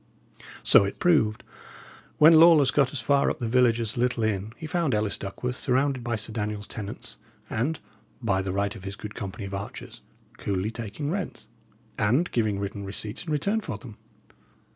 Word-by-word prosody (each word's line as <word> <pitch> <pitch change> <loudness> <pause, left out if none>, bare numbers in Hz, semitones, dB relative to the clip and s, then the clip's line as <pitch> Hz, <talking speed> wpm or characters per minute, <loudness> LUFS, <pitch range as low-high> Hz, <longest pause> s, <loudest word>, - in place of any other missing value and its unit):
So - - +7
it 100 - -3
proved. 150 -12 +2 0.7
When 155 +2 +8
Lawless 160 -4 +7
got 140 -3 +2
as 140 - -2
far 140 -1 +3
up - - -2
the 120 - -3
village 120 -1 +3
as 115 -3 -1
the - - -5
little 125 -2 +1
inn, 105 -1 -1
he 160 - -7
found 155 -5 0
Ellis 105 -1 0
Duckworth 125 +6 -4
surrounded 130 0 +1
by 120 0 -1
Sir 110 +1 -4
Daniel's 105 -1 -3
tenants, 105 -1 -7 0.3
and, 140 +8 -1 0.4
by 100 -6 +1
the 95 0 -3
right 100 +2 -1
of 100 - -10
his 95 +1 -5
good 105 +1 -8
company 100 0 -6
of 100 - -7
archers, 100 +1 -7 0.4
coolly 100 +2 -1
taking 115 +6 -4
rents, 195 0 -4 0.5
and 125 +12 +2
giving 110 -4 +1
written 100 0 -4
receipts 105 - -5
in 165 - -5
return 200 +9 0
for - - -5
them. 115 -5 -12
115 Hz, 185 wpm, -26 LUFS, 100-140 Hz, 0.7 s, When